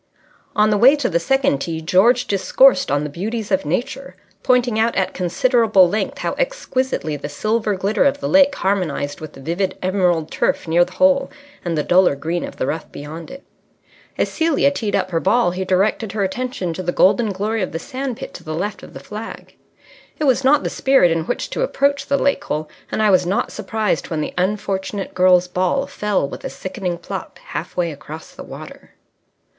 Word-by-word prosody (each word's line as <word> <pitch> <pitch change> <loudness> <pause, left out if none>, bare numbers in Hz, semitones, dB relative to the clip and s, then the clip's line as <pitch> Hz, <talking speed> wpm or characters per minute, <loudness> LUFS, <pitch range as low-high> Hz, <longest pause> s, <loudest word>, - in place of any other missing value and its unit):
On 210 0 +4
the 205 - +2
way 260 +6 +7
to 285 -4 -1
the 170 -2 +1
second 265 - +1
tee 160 +2 -3
George 205 +10 +3
discoursed 260 +7 +4
on 145 +1 +1
the - - -2
beauties 210 +6 -4
of 190 -5 +1
Nature, 260 - -3 0.3
pointing 245 -3 +2
out 230 +1 +2
at 190 - 0
considerable 210 +1 +3
length 210 +5 -2
how - - -2
exquisitely 265 - -1
the 145 +1 -6
silver 215 +6 -1
glitter 200 +3 +1
of 280 0 +2
the 280 - -3
lake 285 0 +5
harmonized 175 -7 -1
with 155 -1 -8
the - - -13
vivid 170 +7 -2
emerald 180 -4 0
turf - - 0
near 170 +2 +4
the 180 +1 -7
hole 275 +1 +3 0.3
and 170 -2 -2
the 150 - +1
duller 180 -3 +4
green 165 +5 -3
of - - -7
the - - -1
rough 155 +4 -4
beyond 155 +3 -8
it. 275 +1 -10 0.7
As - - +1
Celia 320 -3 +2
teed 220 -7 -2
up 185 - -1
her 165 - +1
ball, 195 +2 +2
he 185 +2 -3
directed 195 +3 0
her 210 -2 0
attention 190 -3 -3
to 185 - -5
the 175 -1 -1
golden 210 +5 +3
glory 210 +3 -2
of 185 - -2
the - - -3
sand 255 +7 -5
pit - - -8
to - - -10
the 155 0 -5
left 200 +5 -3
of - - -13
the - - -6
flag. 215 +2 -9 0.6
It - - -3
was 265 -2 +3
not 280 +3 +4
the - - -2
spirit 265 -11 +3
in 165 -1 0
which - - -2
to - - -2
approach 280 - +1
the 280 - +2
lake 280 0 +1
hole, 155 +1 -3 0.2
and 215 - 0
I 210 - +4
was 185 -2 +3
not 195 - 0
surprised 215 -7 -2
when 160 -2 -2
the - - -4
unfortunate 195 +1 -2
girl's 180 -1 +4
ball 185 +9 0
fell 210 - -1
with - - -9
a - - -3
sickening 185 -2 -4
plop - - -7
half - - -7
way 170 -2 0
across 155 +2 -10
the - - -9
water. - - -11
195 Hz, 205 wpm, -20 LUFS, 175-245 Hz, 0.7 s, way